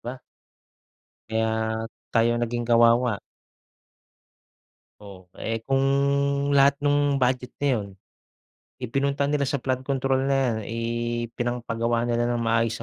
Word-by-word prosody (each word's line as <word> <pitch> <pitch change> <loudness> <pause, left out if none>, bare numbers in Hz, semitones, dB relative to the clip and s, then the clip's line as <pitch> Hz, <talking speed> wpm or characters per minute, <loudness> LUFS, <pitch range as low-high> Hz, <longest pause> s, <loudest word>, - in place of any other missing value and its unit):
ba? 125 +2 -6 1.1
Kaya 110 0 -1 0.3
tayo 115 +1 +4
naging 120 0 -2
kawawa. 115 -1 +4 1.8
Ooh, 95 -3 -13
eh, 115 0 -3
kung 135 +3 +1 0.7
lahat 140 +1 +4
nung 145 -1 +2
budget 125 0 0
na 145 - +2
'yon, 100 -2 -5 0.9
ipinunta 140 +3 -1
nila 140 -1 0
sa 145 - 0
flood 130 0 -2
control 135 -1 0
na 140 - +2
'yan, 130 -4 +1
ipinangpagawa 120 0 -2
nila 120 0 0
ng 120 -1 -1
maayos 115 0 +1
120 Hz, 110 wpm, -25 LUFS, 115-135 Hz, 1.8 s, tayo